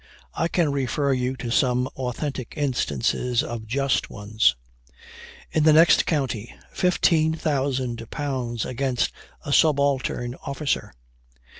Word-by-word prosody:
I 165 Hz, -, 0 dB
can 170 Hz, -3 st, +1 dB
refer 140 Hz, +1 st, 0 dB
you 125 Hz, 0 st, -1 dB
to 120 Hz, -3 st, -5 dB
some 125 Hz, 0 st, +2 dB
authentic 130 Hz, 0 st, -4 dB
instances 125 Hz, -, 0 dB
of 115 Hz, -2 st, -6 dB
just 135 Hz, +3 st, 0 dB
ones. 105 Hz, -, +1 dB, 1.0 s
In 155 Hz, -, +2 dB
the 155 Hz, 0 st, +6 dB
next 165 Hz, +2 st, +6 dB
county, 130 Hz, -7 st, -2 dB, 0.2 s
£15,000 135 Hz, -7 st, 0 dB
against 130 Hz, -1 st, -1 dB, 0.3 s
a 145 Hz, -, -1 dB
subaltern 140 Hz, -5 st, +2 dB
officer. 140 Hz, 0 st, -2 dB
130 Hz, 105 wpm, -24 LUFS, 120-145 Hz, 1.0 s, the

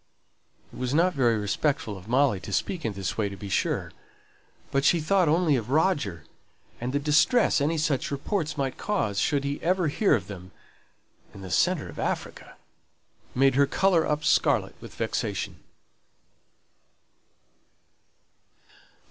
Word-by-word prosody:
It -, -, -10 dB
was 130 Hz, +2 st, -1 dB
not 180 Hz, +3 st, +3 dB
very 120 Hz, -5 st, +2 dB
respectful 110 Hz, +2 st, -1 dB
of 95 Hz, +1 st, -12 dB
Molly 130 Hz, -4 st, +2 dB
to -, -, -9 dB
speak 175 Hz, -4 st, -2 dB
in 110 Hz, -, -2 dB
this 95 Hz, +1 st, -4 dB
way 105 Hz, -2 st, +1 dB
to 100 Hz, -, -8 dB
be 100 Hz, 0 st, -8 dB
sure, -, -, -1 dB, 0.8 s
but 135 Hz, 0 st, +1 dB
she 170 Hz, -, +4 dB
thought 180 Hz, +1 st, +2 dB
only 160 Hz, -2 st, +3 dB
of 115 Hz, -2 st, -3 dB
Roger; 145 Hz, -, +1 dB, 0.6 s
and 120 Hz, +2 st, -3 dB
the 140 Hz, -, 0 dB
distress 150 Hz, -, +3 dB
any 160 Hz, +3 st, +1 dB
such 150 Hz, -4 st, 0 dB
reports 150 Hz, +2 st, -2 dB
might 135 Hz, -2 st, -2 dB
cause, 110 Hz, -, -1 dB
should 140 Hz, -2 st, +1 dB
he 140 Hz, +1 st, -3 dB
ever 180 Hz, -1 st, +1 dB
hear 195 Hz, +2 st, +3 dB
of 100 Hz, -7 st, -3 dB
them 95 Hz, -2 st, -10 dB, 0.8 s
(in 100 Hz, -, -10 dB
the 95 Hz, -2 st, -8 dB
centre -, -, +1 dB
of -, -, -10 dB
Africa!) -, -, -4 dB, 0.8 s
made 135 Hz, +1 st, +4 dB
her 140 Hz, +2 st, +3 dB
colour 180 Hz, +2 st, +2 dB
up 150 Hz, 0 st, -1 dB
scarlet -, -, +2 dB
with -, -, -11 dB
vexation. -, -, -3 dB
140 Hz, 150 wpm, -26 LUFS, 110-160 Hz, 0.8 s, she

